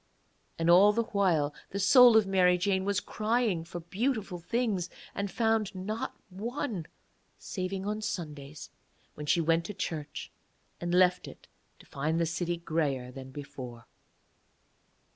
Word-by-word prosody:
And 165 Hz, -, -1 dB
all 190 Hz, +5 st, +7 dB
the 230 Hz, +2 st, +1 dB
while 175 Hz, -9 st, +1 dB, 0.2 s
the 200 Hz, -, -4 dB
soul 240 Hz, +3 st, +8 dB
of 220 Hz, -, +4 dB
Mary 180 Hz, -2 st, +4 dB
Jane 190 Hz, +1 st, 0 dB
was 200 Hz, 0 st, +1 dB
crying 215 Hz, -5 st, 0 dB
for 175 Hz, +1 st, -7 dB
beautiful 205 Hz, 0 st, -2 dB
things, 200 Hz, -2 st, -1 dB, 0.2 s
and 200 Hz, 0 st, -2 dB
found 220 Hz, -2 st, 0 dB
not 210 Hz, +5 st, -4 dB, 0.2 s
one, 215 Hz, -, -4 dB, 0.5 s
saving 190 Hz, 0 st, -4 dB
on 210 Hz, +1 st, -2 dB
Sundays, 150 Hz, -8 st, -6 dB, 0.4 s
when 150 Hz, 0 st, -8 dB
she 170 Hz, -, +3 dB
went 165 Hz, +1 st, +2 dB
to 210 Hz, -, -6 dB
church, 150 Hz, -5 st, -5 dB, 0.5 s
and 175 Hz, 0 st, -3 dB
left 180 Hz, 0 st, +3 dB
it -, -, -12 dB, 0.3 s
to -, -, -18 dB
find 155 Hz, +4 st, -1 dB
the 170 Hz, -, +2 dB
city 170 Hz, +1 st, -2 dB
greyer 150 Hz, -7 st, -1 dB
than 130 Hz, 0 st, -9 dB
before. 130 Hz, -4 st, -9 dB
180 Hz, 145 wpm, -30 LUFS, 165-210 Hz, 0.5 s, soul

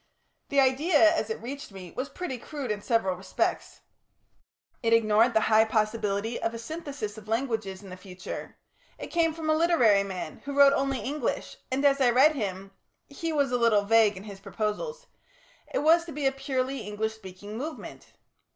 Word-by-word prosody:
The 280 Hz, -, +2 dB
idea, 295 Hz, +5 st, +4 dB
as 225 Hz, -8 st, -2 dB
it 220 Hz, -, -3 dB
reached 275 Hz, 0 st, -7 dB
me, 185 Hz, -3 st, -10 dB
was 260 Hz, +2 st, -3 dB
pretty 340 Hz, -9 st, -5 dB
crude 280 Hz, -3 st, -5 dB
in 205 Hz, -1 st, -3 dB
several 215 Hz, -5 st, +1 dB
respects. 185 Hz, +1 st, -3 dB, 1.0 s
It 230 Hz, -1 st, +2 dB
ignored 225 Hz, +1 st, +4 dB
the 220 Hz, -, +5 dB
high 220 Hz, 0 st, +5 dB
possibility 215 Hz, 0 st, -1 dB
of 225 Hz, 0 st, -2 dB
a -, -, -4 dB
synthesis 275 Hz, -6 st, -6 dB
of 215 Hz, -, -17 dB
languages 220 Hz, -5 st, -2 dB
in 195 Hz, -, -11 dB
the -, -, -6 dB
future; 185 Hz, -1 st, -8 dB, 0.4 s
it -, -, -8 dB
came 335 Hz, -1 st, +2 dB
from 315 Hz, 0 st, -6 dB
a 310 Hz, -, +4 dB
literary 310 Hz, -, +4 dB
man, 185 Hz, -5 st, -6 dB
who 280 Hz, 0 st, -5 dB
wrote 280 Hz, 0 st, +7 dB
only 270 Hz, -3 st, 0 dB
English, 285 Hz, +7 st, -3 dB
and, 270 Hz, +2 st, 0 dB
as 275 Hz, -1 st, +4 dB
I 250 Hz, -, +5 dB
read 265 Hz, +6 st, +5 dB
him 195 Hz, -6 st, -4 dB, 0.4 s
he 325 Hz, +3 st, -4 dB
was 285 Hz, -4 st, +1 dB
a 245 Hz, -, +1 dB
little 225 Hz, -3 st, +4 dB
vague 215 Hz, -1 st, +4 dB
in 190 Hz, -, -9 dB
his 200 Hz, -2 st, -10 dB
proposals 460 Hz, -, -4 dB, 0.7 s
it -, -, -1 dB
was 330 Hz, +2 st, +5 dB
to 335 Hz, -, -8 dB
be 295 Hz, -1 st, -4 dB
a 270 Hz, -, +4 dB
purely 270 Hz, 0 st, -2 dB
English 215 Hz, +1 st, -3 dB
speaking 205 Hz, 0 st, -10 dB
movement. 300 Hz, +7 st, -7 dB
235 Hz, 185 wpm, -27 LUFS, 210-280 Hz, 1.0 s, wrote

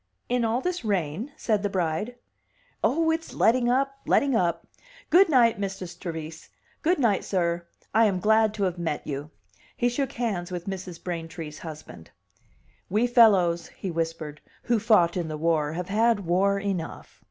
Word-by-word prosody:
"In 245 Hz, -1 st, +1 dB
all 230 Hz, +3 st, +1 dB
this 360 Hz, -1 st, -2 dB
rain?" 200 Hz, -, -2 dB
said 215 Hz, -3 st, 0 dB
the 205 Hz, -, -1 dB
bride. 185 Hz, +5 st, -2 dB, 0.7 s
"Oh, 320 Hz, +3 st, +2 dB
it's 325 Hz, 0 st, -3 dB
letting 240 Hz, +1 st, +3 dB
up, 275 Hz, +2 st, +1 dB
letting 275 Hz, -3 st, +3 dB
up! 170 Hz, -4 st, 0 dB, 0.5 s
Good 365 Hz, +2 st, +6 dB
night, 235 Hz, -7 st, +4 dB
Mistress 195 Hz, -3 st, -4 dB
Trevise. 165 Hz, -3 st, -7 dB, 0.3 s
Good 345 Hz, +3 st, +2 dB
night, 230 Hz, -8 st, +2 dB
sir; 170 Hz, -2 st, -1 dB, 0.3 s
I 225 Hz, +2 st, +5 dB
am 195 Hz, -3 st, +1 dB
glad 220 Hz, +2 st, +4 dB
to 205 Hz, -, -2 dB
have 180 Hz, -2 st, -1 dB
met 160 Hz, -3 st, -3 dB
you." 145 Hz, +1 st, -5 dB, 0.5 s
He 245 Hz, -, +2 dB
shook 265 Hz, +2 st, -2 dB
hands 200 Hz, -7 st, -2 dB
with 175 Hz, -1 st, -5 dB
Mrs. 185 Hz, -3 st, -6 dB
Braintree's 165 Hz, -3 st, -6 dB
husband. 150 Hz, -, -10 dB, 0.8 s
"We 215 Hz, +5 st, +2 dB
fellows," 195 Hz, -9 st, +4 dB
he 190 Hz, -, -4 dB
whispered, 165 Hz, -2 st, -4 dB, 0.2 s
"who 235 Hz, -2 st, +1 dB
fought 205 Hz, -6 st, +4 dB
in 175 Hz, -3 st, -2 dB
the 155 Hz, -1 st, -4 dB
war 155 Hz, -1 st, +1 dB
have 180 Hz, +2 st, -4 dB
had 220 Hz, +1 st, +2 dB
war 195 Hz, +3 st, +2 dB
enough." 195 Hz, -5 st, -5 dB
195 Hz, 165 wpm, -26 LUFS, 170-230 Hz, 0.8 s, Good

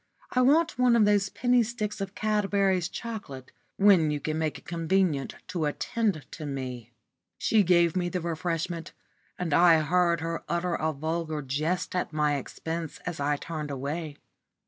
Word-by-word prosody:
"I 255 Hz, -, +2 dB
want 305 Hz, +3 st, +3 dB
one 250 Hz, -1 st, +5 dB
of 220 Hz, -3 st, +5 dB
those 205 Hz, -1 st, +3 dB
penny 245 Hz, +2 st, +2 dB
sticks 215 Hz, -3 st, -3 dB
of 195 Hz, 0 st, -5 dB
Cadbury's 200 Hz, -4 st, +1 dB
chocolate, 200 Hz, -, -7 dB, 0.3 s
when 195 Hz, -6 st, +5 dB
you 150 Hz, -1 st, -1 dB
can 155 Hz, +2 st, -2 dB
make 155 Hz, -2 st, -1 dB
it -, -, -17 dB
convenient 165 Hz, -4 st, 0 dB
to 175 Hz, -4 st, -1 dB
attend 180 Hz, -, -1 dB
to 155 Hz, -, -7 dB
me." 125 Hz, -4 st, -5 dB, 0.5 s
She 220 Hz, -2 st, +3 dB
gave 175 Hz, -2 st, +3 dB
me 175 Hz, -1 st, 0 dB
the 180 Hz, -, -2 dB
refreshment, 170 Hz, 0 st, -3 dB, 0.4 s
and 170 Hz, -4 st, -2 dB
I 170 Hz, +1 st, +6 dB
heard 170 Hz, +1 st, +2 dB
her 165 Hz, 0 st, -3 dB
utter 170 Hz, +1 st, 0 dB
a 160 Hz, -1 st, 0 dB
vulgar 155 Hz, +1 st, -3 dB
jest 155 Hz, +8 st, -2 dB
at 180 Hz, -3 st, -2 dB
my 150 Hz, -1 st, +2 dB
expense 160 Hz, +4 st, -5 dB
as 170 Hz, -3 st, -4 dB
I 145 Hz, +1 st, +1 dB
turned 155 Hz, -1 st, -5 dB
away. 145 Hz, +3 st, -4 dB
170 Hz, 165 wpm, -27 LUFS, 155-195 Hz, 0.5 s, I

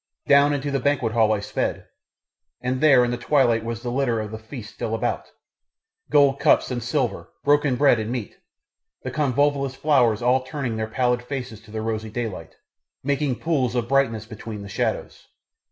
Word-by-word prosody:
Down 140 Hz, +1 st, +5 dB
into 145 Hz, 0 st, -2 dB
the 135 Hz, -, 0 dB
banquethall 115 Hz, -6 st, +2 dB
I 105 Hz, -2 st, 0 dB
sped, -, -, -3 dB, 0.7 s
and 130 Hz, +1 st, -2 dB
there 135 Hz, -5 st, +6 dB
in 120 Hz, -, -2 dB
the 120 Hz, -, -2 dB
twilight 120 Hz, -4 st, +2 dB
was 115 Hz, 0 st, -5 dB
the 120 Hz, -, -3 dB
litter 125 Hz, -3 st, 0 dB
of 105 Hz, -1 st, -5 dB
the 110 Hz, -, -6 dB
feast 110 Hz, -1 st, -9 dB
still 115 Hz, -, -3 dB
about 110 Hz, -, -2 dB, 0.8 s
gold 140 Hz, -2 st, +4 dB
cups 140 Hz, -2 st, +3 dB
and 120 Hz, -1 st, -2 dB
silver, 125 Hz, +1 st, -2 dB
broken 145 Hz, -2 st, +3 dB
bread 135 Hz, -3 st, +4 dB
and 110 Hz, +1 st, -3 dB
meat, 120 Hz, -5 st, -5 dB, 0.6 s
the 130 Hz, -, -4 dB
convolvulus 140 Hz, 0 st, +1 dB
flowers 125 Hz, -7 st, +2 dB
all 125 Hz, +2 st, +3 dB
turning 130 Hz, -3 st, -4 dB
their 110 Hz, 0 st, -2 dB
pallid 125 Hz, +2 st, 0 dB
faces 125 Hz, -4 st, -6 dB
to 110 Hz, -, -19 dB
the 110 Hz, 0 st, -4 dB
rosy 110 Hz, -1 st, -3 dB
daylight, 105 Hz, -8 st, -5 dB, 0.5 s
making 140 Hz, -1 st, 0 dB
pools 130 Hz, -5 st, -1 dB
of 120 Hz, -2 st, 0 dB
brightness 120 Hz, -5 st, +1 dB
between 110 Hz, -1 st, -8 dB
the 100 Hz, -, -9 dB
shadows. -, -, -3 dB
125 Hz, 175 wpm, -23 LUFS, 115-140 Hz, 0.8 s, there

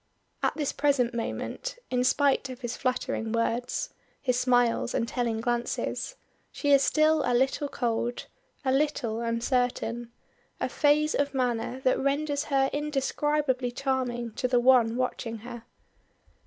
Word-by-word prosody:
At -, -, +1 dB
this 295 Hz, -3 st, 0 dB
present 275 Hz, -4 st, +1 dB
moment, -, -, -4 dB
in 250 Hz, -1 st, +2 dB
spite 275 Hz, +1 st, +2 dB
of 255 Hz, 0 st, -8 dB
his 240 Hz, -1 st, -3 dB
flattering 250 Hz, -3 st, -2 dB
words, 230 Hz, +2 st, -1 dB, 0.3 s
his 250 Hz, -2 st, 0 dB
smiles 245 Hz, -2 st, +2 dB
and 230 Hz, -, 0 dB
telling 230 Hz, -2 st, -1 dB
glances, 240 Hz, -, -2 dB, 0.4 s
she 285 Hz, -, -1 dB
is 280 Hz, -1 st, +7 dB
still 310 Hz, +1 st, +3 dB
a 245 Hz, -, +1 dB
little 265 Hz, +3 st, +1 dB
cold, 240 Hz, -1 st, -2 dB, 0.4 s
a 260 Hz, -, +3 dB
little 265 Hz, -5 st, 0 dB
uncertain, 235 Hz, 0 st, -1 dB, 0.5 s
a -, -, -1 dB
phase 300 Hz, +1 st, +3 dB
of 285 Hz, -1 st, 0 dB
manner 245 Hz, 0 st, -1 dB
that 255 Hz, -, +2 dB
renders 285 Hz, +1 st, 0 dB
her 270 Hz, -2 st, +2 dB
indescribably 290 Hz, -2 st, 0 dB
charming 250 Hz, -3 st, -2 dB
to 250 Hz, -, -1 dB
the 250 Hz, -1 st, +3 dB
one 240 Hz, -2 st, +5 dB
watching 245 Hz, -2 st, -2 dB
her. 240 Hz, -2 st, -8 dB
255 Hz, 140 wpm, -28 LUFS, 240-280 Hz, 0.5 s, is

